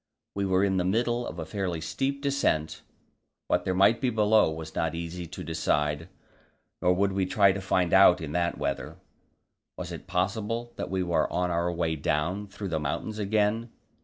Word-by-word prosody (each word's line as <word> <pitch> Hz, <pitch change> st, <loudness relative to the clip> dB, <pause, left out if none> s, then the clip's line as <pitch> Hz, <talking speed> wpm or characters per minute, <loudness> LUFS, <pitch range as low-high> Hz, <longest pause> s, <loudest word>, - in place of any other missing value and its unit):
We 100 Hz, -1 st, -1 dB
were 95 Hz, +1 st, +3 dB
in 95 Hz, -1 st, +2 dB
the 90 Hz, -, +1 dB
middle 120 Hz, +5 st, 0 dB
of -, -, -7 dB
a -, -, -4 dB
fairly 95 Hz, -5 st, -3 dB
steep 135 Hz, -, -2 dB
descent; 140 Hz, -, 0 dB, 0.6 s
what 90 Hz, -, 0 dB
there 95 Hz, -1 st, 0 dB
might 100 Hz, +5 st, +4 dB
be 130 Hz, -, +2 dB
below 110 Hz, -4 st, +4 dB
was 80 Hz, 0 st, -7 dB
not 80 Hz, 0 st, -1 dB
easy 85 Hz, +1 st, -5 dB
to -, -, -8 dB
decide, 75 Hz, 0 st, -1 dB, 0.7 s
nor 90 Hz, -, +4 dB
would 100 Hz, +2 st, +1 dB
we 95 Hz, -1 st, 0 dB
try 100 Hz, 0 st, +4 dB
to 100 Hz, +1 st, -4 dB
find 90 Hz, -2 st, +1 dB
out 95 Hz, -2 st, +7 dB
in 80 Hz, -3 st, -5 dB
that 85 Hz, +2 st, 0 dB
weather. 70 Hz, 0 st, -3 dB, 0.8 s
Was -, -, -6 dB
it -, -, -8 dB
possible 110 Hz, +6 st, -2 dB
that -, -, -4 dB
we 95 Hz, -1 st, 0 dB
were 85 Hz, -1 st, 0 dB
on 90 Hz, 0 st, 0 dB
our 85 Hz, +1 st, 0 dB
way 85 Hz, -2 st, -1 dB
down 85 Hz, +7 st, -1 dB
through 100 Hz, 0 st, -6 dB
the 80 Hz, -2 st, -1 dB
mountains 90 Hz, +9 st, -3 dB
again? 105 Hz, +3 st, +1 dB
95 Hz, 190 wpm, -27 LUFS, 85-105 Hz, 0.8 s, out